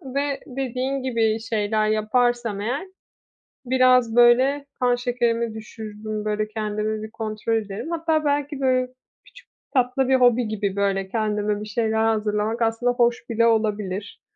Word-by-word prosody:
ve 280 0 -1
dediğin 265 +1 -3
gibi 225 -3 +1
şeyler 215 -1 0
yaparsam 225 0 +1
eğer 265 - -3 0.8
biraz, 255 -2 +4
böyle, 255 +4 +5
kan 245 -1 +3
şekerimi 235 -2 -1
düşürürüm, 215 -1 -7
böyle, 215 0 -1
kendimi 215 0 -3
bir 220 - -8
kontrol 220 0 -2
ederim. 215 +7 -4
Hatta 320 -2 0
belki, 285 -1 -1
böyle, 255 -1 +2 0.4
küçük - - -18 0.3
tatlı 255 +1 +1
bir 265 - +5
hobi 245 -2 +4
gibi, 200 -2 -2
böyle, 195 -1 0
kendime 210 -1 -1
bir - - -5
şeyler 220 +1 0
hazırlamak 215 +1 0
aslında 225 +2 +1
hoş 240 -1 0
bile 230 0 +3
olabilir 210 -3 -1
225 Hz, 140 wpm, -23 LUFS, 215-250 Hz, 0.8 s, böyle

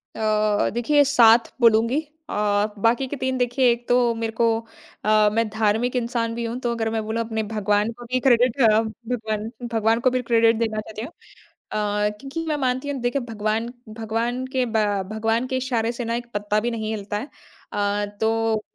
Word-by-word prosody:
अ, 215 -1 +1
देखिए 285 +5 +3
7 235 -4 +5
बोलूँगी। 230 +4 +4 0.3
अ, - - -4 0.4
बाकी 230 +5 +2
के 290 - -4
3 260 0 -1
देखिए 245 +1 +2
एक 235 0 -4
तो 245 -1 +3
मेरे 225 0 -3
को 230 +1 +2 0.6
अ, 215 0 +5
मैं 230 0 +1
धार्मिक 220 +3 0
इंसान 235 -1 -1
भी 235 0 -3
हूँ। 230 +2 -4
तो 240 -2 -1
अगर 225 -1 -1
मैं 220 0 -2
बोलूँ 220 +1 -1
अपने 220 -1 -3
भगवान 210 +1 +1
को 240 - -10
भी 255 - +2
क्रेडिट 250 0 +3
अ, 230 - +7
भगवान 220 -1 -4 0.2
भगवान 225 +1 +2
को 255 - +3
भी 255 0 0
क्रेडिट 230 -1 +3
देना 220 -2 -1
चाहती 215 0 -7
हूँ। 240 - -6 0.6
अ, 210 0 0
क्योंकि 290 +5 -5
मैं 305 - 0
मानती 260 0 -1
हूँ 280 -2 -3
देखिए 245 +3 0
भगवान 220 +1 -1 0.3
भगवान 230 +3 -2
के 260 -1 +2
बा 220 -2 +1 0.3
भगवान 225 +3 0
के 260 0 -1
इशारे 240 -3 -1
से 240 0 -5
ना 230 +1 -1
एक 240 0 -6
पत्ता 205 0 0
भी 240 +3 -2
नहीं 220 -2 -3
हिलता 205 0 -4
है। 255 +8 -6 0.4
अ, 205 0 0 0.2
तो 225 -1 +1
230 Hz, 190 wpm, -23 LUFS, 220-245 Hz, 0.6 s, अ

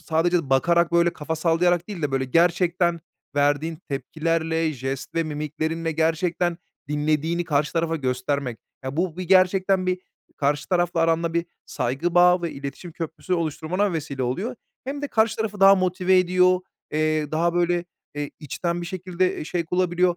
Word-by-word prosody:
sadece 165 -2 +1
bakarak, 170 +5 +3
böyle, 170 0 +4
kafa 160 +2 -4
sallayarak 175 +2 +2
değil 195 -6 -6
de, 145 - 0
böyle, 135 0 +1
gerçekten 170 +3 +2 0.4
verdiğin 145 +3 +1
tepkilerle, 160 +3 -1
jest 135 0 -5
ve 165 - +2
mimiklerinle 155 +2 -3
gerçekten 165 +2 0 0.3
dinlediğini 155 +3 0
karşı 150 -2 0
tarafa 165 -1 0
göstermek. 130 -2 -2 0.3
Ya, 130 +3 -4
bu 175 -2 -1
bir 185 - -4
gerçekten 185 +1 +3
bir, 185 0 0 0.4
karşı 145 +1 0
tarafla 175 -2 +1
aranda 165 0 +1
bir 170 +1 0 0.2
saygı 140 +8 -2
bağı 180 0 +5
ve 170 - -1
iletişim 140 +5 -7
köprüsü 165 +3 -3
oluşturmana 170 +4 -1
vesile 145 -4 -3
oluyor. 190 - -2 0.3
Hem 280 +2 -5
de 290 - -2
karşı 220 -2 +2
tarafı 210 -2 -3
daha 195 0 +9
motive 185 0 +2
ediyor, 185 0 +3 0.3
eee, 155 -1 0
daha 170 +2 +1
böyle, 175 0 +1 0.3
eee, 145 0 -4
içten 170 +4 -3
bir - - -5
şekilde 185 0 -1
e - - -4
şevk 170 0 -3
bulabiliyor. 180 -1 +2
170 Hz, 160 wpm, -24 LUFS, 155-180 Hz, 0.4 s, daha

